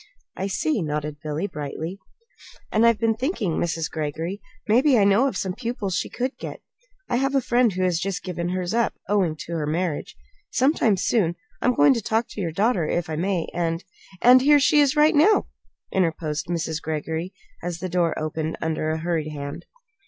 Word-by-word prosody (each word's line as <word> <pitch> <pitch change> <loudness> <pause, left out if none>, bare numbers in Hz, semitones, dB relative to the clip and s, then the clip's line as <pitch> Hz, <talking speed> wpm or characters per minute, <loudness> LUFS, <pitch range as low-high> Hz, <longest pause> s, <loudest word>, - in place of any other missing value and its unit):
"I 190 - -2
see," 220 +6 0
nodded 150 -1 -3
Billy, 155 +3 -2
brightly; 160 +2 -5 0.7
"and 225 +2 +4
I've 230 -2 +4
been 225 +1 +2
thinking, 230 - -1
Mrs. 165 -1 -1
Greggory 160 +5 -4 0.3
maybe 250 +5 +4
I 205 - +5
know 200 +7 +4
of 230 - -3
some 190 -1 -2
pupils 230 -5 -3
she - - -1
could 255 +3 -3
get. - - -6 0.5
I 240 - 0
have 270 +2 0
a - - +5
friend 240 -2 +2
who 185 0 -2
has 180 -3 +1
just 195 +1 -3
given 175 -2 -3
hers 180 +1 -2
up, 235 -1 +1
owing 190 -6 +1
to - - -8
her 155 -3 -2
marriage. 165 0 -2 0.3
Sometime, 250 -6 +2
soon, 180 -4 +1 0.3
I'm 250 0 +2
going 145 - +6
to 230 - -2
talk 225 +3 0
to 210 - -6
your 170 -3 -2
daughter, 195 -2 +1
if 175 0 -1
I - - -1
may, 180 +1 -1
and 165 0 -1 0.2
" 190 -2 -21
"And 250 +1 +8
here 290 +2 +6
she 295 +1 +4
is 285 +1 +3
right 300 +2 +5
now," 340 +8 +5 0.5
interposed 160 -4 -1
Mrs. 165 -2 -2
Greggory, 160 +3 -3 0.3
as 175 -1 -4
the 185 +2 -4
door 175 -2 0
opened 155 +1 -3
under 160 -1 -1
a 160 - 0
hurried 160 -2 -1
hand. 145 +3 -7
180 Hz, 195 wpm, -24 LUFS, 160-230 Hz, 0.7 s, And